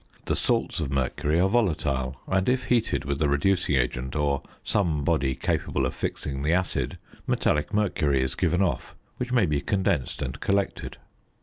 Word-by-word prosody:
The - - 0
salts - - 0
of 75 -4 -2
mercury 70 +4 0
are 95 - +4
volatile, 75 - 0
and, 95 +3 +1
if 130 0 +1
heated 120 -1 +1
with 70 +1 -2
a 75 - +3
reducing 80 +2 +2
agent 65 +1 -1
or 70 -2 +1 0.2
some 85 -8 0
body 65 -1 +1
capable 65 - -1
of 65 - -2
fixing 70 -1 -3
the 75 +3 +2
acid, 90 0 -1 0.3
metallic 75 +5 +1
mercury 75 -10 +1
is 65 - -2
given 90 +2 +1
off, 85 - -2 0.2
which 125 0 -3
may 120 -5 +4
be 75 -3 0
condensed 85 -9 0
and 65 +1 -5
collected. 100 0 -1
75 Hz, 170 wpm, -26 LUFS, 70-95 Hz, 0.3 s, are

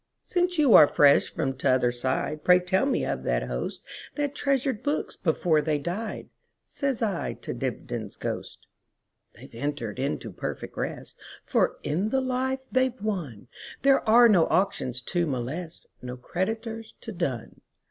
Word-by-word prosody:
"Since 355 -1 0
you 285 -7 +5
are 150 - +10
fresh 145 -1 +5
from 135 - -1
t'other 130 -2 +2
side, 130 +5 -2
Pray 180 0 +6
tell 190 +8 +1
me - - +1
of - - -2
that - - 0
hostThat 290 -1 -5
treasured 270 -6 0
books 290 +1 -2
before 160 -1 +2
they 150 0 0
died,"Says 225 - -5
I 200 -6 -1
to - - -6
Dibdin's - - -4
ghost."They - - -9
've - - -17
entered 145 +2 -4
into 130 -4 -2
perfect - - -6
rest; - - -5 0.3
For - - +1
in 175 +9 0
the 265 - +1
life 260 +1 -1
they 260 0 +3
've 250 0 -16
wonThere 200 - -1
are 235 +2 +8
no 185 -7 +5
auctions 130 -10 0
to 175 +2 0
molest, 150 +6 -4 0.2
No 125 0 -6
creditors 220 - -4
to 225 - -6
dun. 170 - -4
180 Hz, 145 wpm, -26 LUFS, -, 0.3 s, are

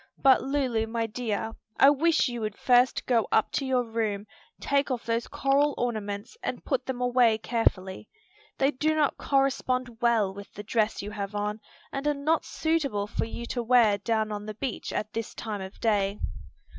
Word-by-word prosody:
But, 270 -1 +5
Lulu, 260 -5 0
my 230 0 -1
dear, 225 -1 -3 0.3
I 275 - +8
wish 315 +2 +3
you 240 -2 -4
would 215 -1 -3
first 250 0 +3
go 235 -4 +2
up 220 - +3
to 275 - -1
your 255 -1 +2
room, 220 -3 -2 0.3
take 280 0 +1
off 250 -3 -3
those 230 0 -1
coral 285 0 +2
ornaments 210 - -3
and - - -4
put - - -1
them 260 -2 -3
away 245 -3 +4
carefully. 215 -4 -1 0.5
They 275 +1 +3
do 310 +3 0
not 300 -2 +1
correspond 255 -3 0
well 225 -5 +3
with 200 +1 -10
the 205 - -7
dress 215 -1 0
you 205 - -5
have 205 -1 -5
on, 210 +1 -2 0.3
and 275 +2 -3
are 295 - +2
not 305 +3 +1
suitable 285 -11 0
for 205 - -2
you 235 +1 -6
to 240 +1 -2
wear 230 -4 +4
down 220 0 0
on 210 0 -5
the 215 - -5
beach 255 +1 -4
at 215 0 -3
this 225 -1 -4
time 215 -3 -4
of 190 +1 -9
day." 205 -2 +1
230 Hz, 185 wpm, -27 LUFS, 210-265 Hz, 0.5 s, I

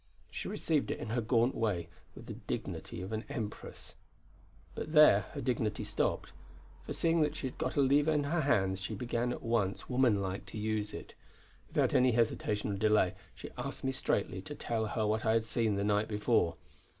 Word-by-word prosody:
She - - -5
received 155 -3 0
it - - -1
in 110 - -5
her 120 +1 +1
gaunt 115 +2 +2
way 95 -7 -1 0.3
with - - -11
the - - -6
dignity 90 - -5
of 95 - -6
an 110 0 -2
empress. 110 -3 -6 0.8
But 155 - -5
there 150 - +7
her - - -4
dignity 110 -4 -1
stopped; 105 0 -1 0.5
for - - -5
seeing 165 0 +2
that 150 0 +1
she 155 - -4
had 130 - -5
got - - -1
a 145 - +4
lever 145 +3 +4
in 150 -2 +2
her 160 +4 0
hands 95 -9 +1
she 95 - -4
began 120 0 -1
at - - -5
once, 115 -4 0
womanlike, 100 -7 +1
to 95 - -8
use 105 -1 -1
it. - - -8 0.5
Without - - +1
any 125 -1 +4
hesitation 110 -2 0
or 100 - -2
delay 105 -3 +3 0.2
she - - -9
asked 135 +3 -5
me 135 - +1
straightly 130 - -1
to - - -7
tell 110 -2 -2
her 110 0 -1
what 110 +1 0
I 110 - +3
had 115 -1 +3
seen 110 -1 0
the 100 - -1
night 105 +1 +2
before. 105 -5 +1
110 Hz, 200 wpm, -32 LUFS, 105-130 Hz, 0.8 s, there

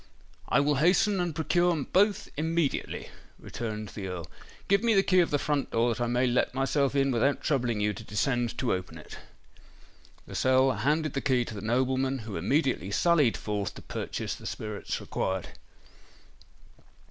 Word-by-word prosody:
"I - - +4
will 145 0 +1
hasten 185 +6 +3
and 175 -3 -1
procure 170 -1 +1
both 205 +2 +2
immediately," 160 -1 -1 0.3
returned 110 -2 -5
the 100 -3 -6
Earl. 90 -2 -5 0.4
"Give 200 0 +3
me 230 -2 +3
the 195 - +5
key 185 -1 +3
of 175 - +3
the 145 - +2
front 145 -1 -1
door 115 +1 +2
that 115 - -6
I - - 0
may 120 +2 +1
let 125 +1 +1
myself 135 +1 +1
in 135 -1 +2
without 130 +4 +1
troubling 125 -7 0
you 105 0 +1
to - - -9
descend 120 +3 -1
to 125 -1 0
open 90 -3 -5
it." 80 - -11 1.1
Lascelles 130 0 +2
handed 155 +1 +1
the 140 - -1
key 125 -3 +1
to - - -7
the 100 - -6
nobleman, 130 +3 0
who 105 -3 -6
immediately 130 - 0
sallied 150 +2 +3
forth 105 -2 -3
to - - -11
purchase - - -4
the - - -8
spirits 105 -1 -4
required. 95 -1 -3
130 Hz, 170 wpm, -28 LUFS, 110-155 Hz, 1.1 s, the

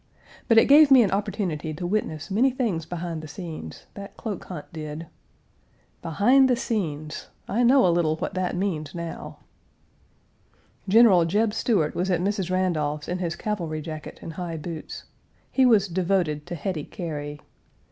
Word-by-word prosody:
But 230 - +4
it - - +8
gave 290 +1 +7
me 260 -3 +8
an 195 - 0
opportunity 185 -6 -2
to 175 - -5
witness 175 -4 -2
many 240 +7 +4
things 220 - -2
behind 170 -2 -4
the 155 - -8
scenes 155 - -8
that 200 +1 -10
cloak 210 -5 -5
hunt 170 -6 -7
did. 155 0 -6 1.0
Behind 245 - +4
the 250 - +4
scenes! 155 - -3 0.2
I 225 +5 0
know 255 +1 +5
a 175 - +4
little 165 -2 +2
what - - -4
that 185 -1 -1
means 175 -6 -2
now. 170 -1 -6 1.5
General 200 -5 +6
Jeb 210 +5 +1
Stuart 195 -12 +1
was 185 +2 -1
at 180 -2 +2
Mrs. 195 -1 -1
Randolph's 155 -5 -1
in 180 +1 -2
his 170 -2 -2
cavalry 170 -7 -3
jacket 155 0 -7
and 165 - -7
high 170 -1 -5
boots. 160 0 -7 0.5
He 265 -1 +4
was 215 -4 +4
devoted 175 -4 0
to 175 - -4
Hetty 160 -1 -3
Cary. 150 -5 -6
180 Hz, 160 wpm, -25 LUFS, 155-205 Hz, 1.5 s, it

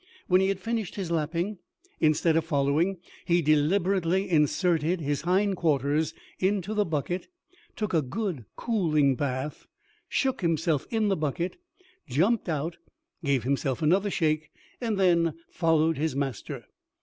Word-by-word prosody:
When 185 +1 +4
he 190 - +3
had 195 -1 -1
finished 225 -1 -3
his 185 -4 -4
lapping, 170 +5 -1 0.4
instead 155 +1 +3
of 165 - +3
following, 155 +4 +1 0.3
he 175 0 +2
deliberately 175 +5 +2
inserted 165 +1 +2
his 145 -2 -1
hind 190 +3 +1
quarters 150 -1 +1 0.2
into 195 +1 0
the 210 -1 +2
bucket 165 +3 -2 0.5
took 210 -4 -3
a 160 - +4
good 150 - -3
cooling 155 - +2
bath 135 +2 -3 0.4
shook 265 -5 0
himself 165 -4 +1
in 220 -2 +1
the 195 - +2
bucket 160 +3 -2 0.5
jumped 180 - +1
out 160 +2 -2 0.5
gave 140 -5 +1
himself 135 +2 -1
another 190 +6 +3
shake, 155 -4 0 0.3
and 225 -4 -1
then 170 -4 +3 0.2
followed 160 -2 +2
his 155 -2 0
master. 135 -5 -4
165 Hz, 135 wpm, -27 LUFS, 150-190 Hz, 0.5 s, When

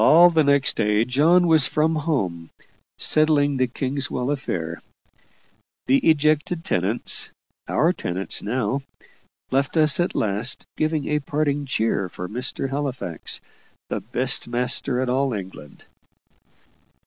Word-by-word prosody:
All 175 +2 +7
the 160 -2 +3
next 140 -1 +2
day 105 0 +2
John 160 +8 +4
was 160 -4 +4
from 155 +1 +1
home, 100 - -2 0.5
settling 145 -2 +3
the 130 0 +2
Kingswell 130 +1 -2
affair. 85 - -4 1.0
The 135 +1 +4
ejected 155 +2 +1
tenants 95 +7 +1 0.4
our - - +2
tenants 90 +2 -3
now 125 +4 -1 0.7
left 135 +4 0
us 155 0 +4
at 175 - 0
last, 110 +5 0
giving 155 -1 -1
a 150 0 +1
parting 145 0 -1
cheer 110 -7 0
for 90 +1 -7
Mr. 125 +5 -3
Halifax, 135 - -3 0.5
the - - -2
best - - -2
master 125 +1 -1
in - - -3
all 130 +1 0
England. 95 -7 -9
135 Hz, 125 wpm, -23 LUFS, 115-150 Hz, 1.0 s, All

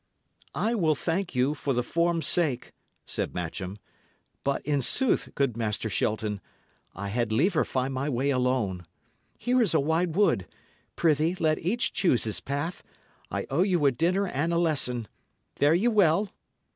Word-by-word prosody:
"I 225 +2 +1
will 165 -9 +2
thank 175 +3 -2
you, 130 +4 +2
for 145 -3 -2
the 125 - +1
form's 170 +4 0
sake," 145 -8 0 0.3
said - - -3
Matcham. 90 +3 -4 0.7
"But, 140 0 -1
in 145 -1 +1
sooth, 260 - 0
good 135 -5 +1
Master 110 -1 -2
Shelton, 105 0 -1 0.5
I 100 +1 -4
had 115 +1 -1
liever 155 - +3
find 130 +1 -2
my 135 +3 -2
way 135 +2 0
alone. 125 -8 0 0.6
Here 250 +1 +2
is 195 -8 +1
a - - +5
wide 160 +3 0
wood; 190 - +2 0.5
prithee, 160 +1 +2
let 155 -4 +1
each 225 +8 0
choose 150 -11 +2
his 110 -2 0
path; 145 +6 -3 0.5
I - - -3
owe 145 +6 +2
you 180 -6 +2
a 140 - +6
dinner 175 +10 +1
and 165 -2 -1
a 170 - +1
lesson. 135 -9 +1 0.5
Fare 145 +3 +4
ye 200 +7 +2
well!" 200 -3 +3
145 Hz, 160 wpm, -27 LUFS, 125-175 Hz, 0.7 s, a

